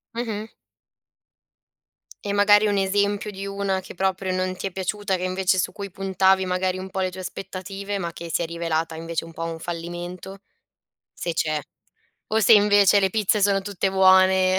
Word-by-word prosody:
Mh-mh. 220 -2 -4 1.7
E, 200 - -1
magari, 205 +1 +5
un 205 -1 +1
esempio 200 +2 0
di 195 -1 -7
una 195 -1 -2
che 185 - -11
proprio 190 0 -1
non 185 0 -1
ti - - -6
è 195 - -2
piaciuta, 190 +1 -2
che, 180 - -5
invece 185 0 +1
su - - 0
cui 200 -2 -7
puntavi, 190 0 +2
magari, 185 0 -1
un 190 +1 -7
po' 190 0 -3
le 185 0 -1
tue 185 - -9
aspettative, 195 +2 -6
ma 170 -2 -3
che 170 0 -8
si - - 0
è 170 - -2
rivelata, 165 -1 -2
invece, 165 0 -4
un 165 - -11
po' 165 - -5
un 165 -1 -4
fallimento? 175 +3 -6 0.8
Se 170 - -3
c'è. 155 -2 0 0.7
O 220 - +3
se 225 - +5
invece 205 -1 +6
le 190 - +3
pizze 210 +1 +1
sono 200 -1 +2
tutte 195 -1 -2
buone? 190 0 +5
190 Hz, 180 wpm, -23 LUFS, 180-200 Hz, 1.7 s, invece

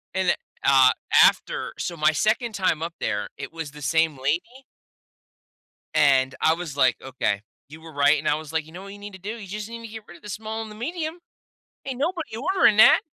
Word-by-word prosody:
And, 190 -1 +2 0.3
uh, 135 -2 +6 0.3
after - - +1
so, 170 - -4
my 155 -1 +3
2nd 220 - 0
time 185 -5 0
up 165 +1 -4
there, 105 -1 -2
it - - -7
was 160 -2 -5
the 150 0 -12
same 160 0 +1
lady 170 - -2 1.3
and 130 -3 +4
I 160 - +4
was, 165 -4 -6
like, 130 -3 +3
"Okay, 115 -6 -2 0.3
you 155 +2 -12
were 160 -1 -12
right." 145 +1 +4
And - - -5
I 150 - +3
was, 155 -1 -7
like, 160 -2 -1
"You 160 - -15
know 185 +2 -9
what 200 0 -9
you 205 - -12
need 205 0 -9
to 190 - -11
do? 210 +5 -5
You 205 -4 -9
just 210 +3 -6
need 230 0 -8
to 230 - -8
get 220 0 -9
rid 175 - -12
of - - -25
the 210 - -9
small 220 +3 -5
and 220 - -7
the 210 - -11
medium. 315 +7 -4 0.7
Ain't 265 -2 -4
nobody 330 -4 -2
ordering 270 - +3
that." 220 - +8
175 Hz, 225 wpm, -24 LUFS, 150-220 Hz, 1.3 s, that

